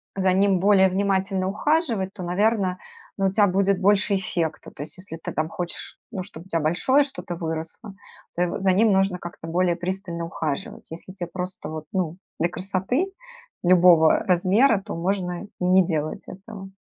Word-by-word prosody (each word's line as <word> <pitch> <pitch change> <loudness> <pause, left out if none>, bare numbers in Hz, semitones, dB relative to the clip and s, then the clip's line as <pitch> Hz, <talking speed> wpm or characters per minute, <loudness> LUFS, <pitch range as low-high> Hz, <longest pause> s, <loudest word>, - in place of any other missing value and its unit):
за 190 -1 +2
ним 195 0 +3
более 190 0 +5
внимательно 190 0 0
ухаживать, 225 - 0
то, - - -9
наверно, 190 +1 +1 0.4
ну, 195 - +2
у - - 0
тя 205 +1 +4
будет 195 +1 +1
больше 200 +1 +3
эффекта. 170 -4 -2
То 145 - -7
есть 155 - -8
если 185 -3 -5
ты - - -6
там 155 0 -1
хочешь, 175 0 -6
ну, 195 -5 -4
чтобы 175 -3 -12
у - - -16
тя 165 - +1
большое 175 - +3
что-то 270 -10 -6
выросло, 165 +5 -5 0.4
то 175 - -1
его 180 +3 -2
за 190 -1 +3
ним 215 +3 +4
нужно 190 -1 +2
как-то 175 -2 -9
более 175 +1 +1
пристально 175 -1 -4
ухаживать. 155 -3 -5
Если 170 +3 -8
те 180 -2 -5
просто 180 -2 -5
вот, 155 -1 -6
ну, 175 -3 -1 0.2
для 170 - +2
красоты, 195 - -1 0.6
любого 175 -3 +6
размера, 195 +6 +3
то 205 +2 -7
можно 180 +1 -2
и 180 - -1
не 185 +1 +5
делать 155 -3 -2
этого. 195 0 -10
185 Hz, 180 wpm, -24 LUFS, 175-200 Hz, 0.6 s, любого